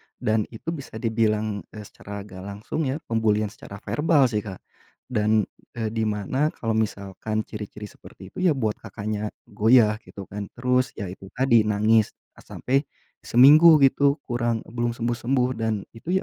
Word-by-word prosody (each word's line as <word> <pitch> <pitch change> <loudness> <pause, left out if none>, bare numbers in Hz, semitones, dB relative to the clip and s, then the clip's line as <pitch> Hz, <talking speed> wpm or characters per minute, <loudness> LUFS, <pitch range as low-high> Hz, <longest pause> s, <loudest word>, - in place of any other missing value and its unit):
dan 110 -1 0
itu 120 +8 -6
bisa 140 -8 -8
dibilang, 110 -2 0 0.2
eee, 105 - -7
secara 100 0 -9
gak 95 -2 -11
langsung 105 +10 -4
ya 145 +4 -3
pembulian 110 -2 0
secara 100 -3 -11
verbal 150 -2 +2
sih, 105 - 0
Kak. 100 -3 -8 0.5
Dan, 110 -1 +2 0.3
eee, 110 -2 -2
di 110 -1 -1
mana 130 +9 -1
kalau 115 -1 -2
misalkan 110 0 -2
ciri-ciri 105 -1 -8
seperti 95 -1 -12
itu - - -8
ya 155 - +3
buat 110 -5 -1
Kakaknya 105 0 -4 0.2
goyah 110 0 +3
gitu 100 - -9
kan. 100 -1 -5
Terus 125 +1 0
ya 100 -4 -5
itu 95 0 -11
tadi, 120 -4 +4
nangis 110 +1 +2 0.2
sampai 135 +2 -1 0.4
seminggu 150 +7 +7
gitu 140 +1 +4
kurang, 120 -2 -1
belum 120 0 -3
sembuh-sembuh, 125 +2 0
dan 110 -3 -1
itu 160 +11 -4
110 Hz, 155 wpm, -24 LUFS, 105-125 Hz, 0.5 s, seminggu